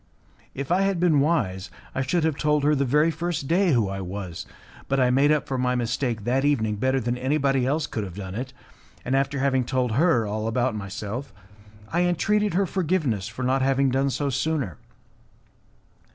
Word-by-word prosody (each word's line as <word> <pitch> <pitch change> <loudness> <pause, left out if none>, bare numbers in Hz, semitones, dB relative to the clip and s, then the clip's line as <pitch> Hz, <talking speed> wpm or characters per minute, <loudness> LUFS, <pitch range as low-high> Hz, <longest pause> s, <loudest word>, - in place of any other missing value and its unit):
If 140 +3 -4
I 185 +2 +3
had 195 -2 +1
been 165 -4 +4
wise, 105 - 0 0.2
I 130 - -1
should 145 +6 0
have 160 -2 +1
told 150 0 +1
her 150 +1 +4
the 140 -1 +1
very 150 +5 +3
first 165 -2 -3
day 180 +3 +3
who 115 -5 +2
I 95 0 -4
was, 95 -2 -6 0.4
but 135 0 +1
I 125 -1 +3
made 140 +3 +4
up 150 -1 +1
for 130 -1 -2
my 125 0 +1
mistake 120 -2 -1
that 130 +4 +1
evening 110 -8 +1
better 130 +4 +1
than 120 0 -2
anybody 135 -1 +1
else 150 +3 0
could 110 - -4
have 95 -3 -7
done 95 -2 -6
it, 125 +5 -5 0.5
and, 130 - 0
after 140 +1 0
having 130 -1 +1
told 125 0 -1
her 130 -2 +3
all 110 +1 -3
about 120 +2 0
myself, 105 +6 -5 0.6
I 175 - +1
entreated 185 +3 +1
her 195 +1 +3
forgiveness 155 - -1
for 115 +3 -6
not 130 +1 +1
having 135 0 +2
done 135 +2 +1
so 140 +2 -1
sooner. 135 - -2
135 Hz, 195 wpm, -25 LUFS, 115-150 Hz, 0.6 s, been